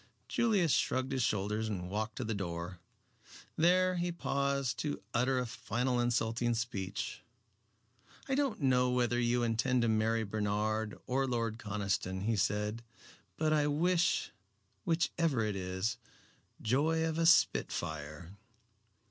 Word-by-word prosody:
Julius 205 -9 +2
shrugged 130 +1 +1
his 135 -1 0
shoulders 105 0 0
and 90 -4 -3
walked 110 +3 -3
to 130 - -3
the 115 -1 -2
door. 90 -2 -4 0.8
There 185 +2 +3
he 175 0 -1
paused 140 -5 -1
to 150 -1 -2
utter 125 +2 +2
a 125 - 0
final 120 +2 -1
insulting 120 0 +1
speech. 105 -5 -3 1.1
"I 270 - -1
don't 270 - 0
know 125 -1 +3
whether 120 -1 +1
you 120 0 +2
intend 120 +2 +1
to - - +2
marry 110 +1 +2
Bernard 105 +1 -1
or 135 +1 0
Lord 115 -2 -1
Conniston," 100 -3 -2
he 115 +2 +1
said, 105 +3 -1 0.5
"but 155 0 +2
I 150 -1 +3
wish, 175 +4 +1 0.5
which 165 0 +1
ever 145 -9 +2
it 105 -2 -2
is, 95 +2 -2 0.6
joy 155 +7 +1
of 160 0 -1
a 165 - +4
spitfire." 80 - +1
120 Hz, 135 wpm, -33 LUFS, 105-140 Hz, 1.1 s, a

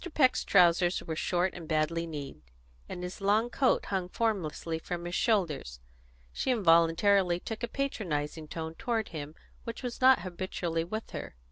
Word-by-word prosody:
Peck's 260 -4 +4
trousers 175 +1 +4
were 160 - -4
short 180 +3 0
and 170 -2 -9
badly 165 +2 0
kneed, 145 - -7 0.5
and 180 - -6
his 180 +2 -6
long 215 +4 +2
coat 265 +1 +2
hung 185 -2 -2
formlessly 175 -7 -1
from 175 +1 -5
his 175 - -5
shoulders; 165 - 0 0.5
she - - -2
involuntarily 175 -2 +4
took 225 +5 -6
a 235 - -1
patronising 165 - -3
tone 160 +1 -5
toward 230 +1 -2
him 150 -1 -7 0.3
which 230 +3 -6
was 245 0 -5
not 260 0 +6
habitual 175 -2 -3
with 215 +5 -5
her. - - -7
180 Hz, 155 wpm, -30 LUFS, 165-220 Hz, 0.5 s, not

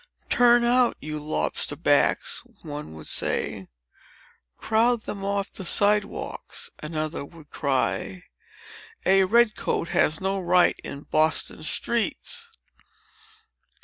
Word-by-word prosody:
"Turn 240 0 +5
out, 245 0 +3
you 155 0 -5
lobster 110 - -2
backs!" - - +2 0.2
one 145 - -7
would 80 - -10
say. 95 -2 0 0.9
"Crowd 225 +1 +1
them 200 -1 -6
off 200 0 -2
the 190 - -7
side 205 +3 +3
walks!" - - -6
another 155 -1 -3
would 155 0 -15
cry. 140 +6 -1 0.8
"A 190 0 +5
red 230 +2 +3
coat 170 - -2
has 155 - +2
no 195 +1 -1
right 180 0 +3
in 140 +1 -7
Boston 155 0 +1
streets." 280 - -2
190 Hz, 115 wpm, -25 LUFS, 155-225 Hz, 0.9 s, Turn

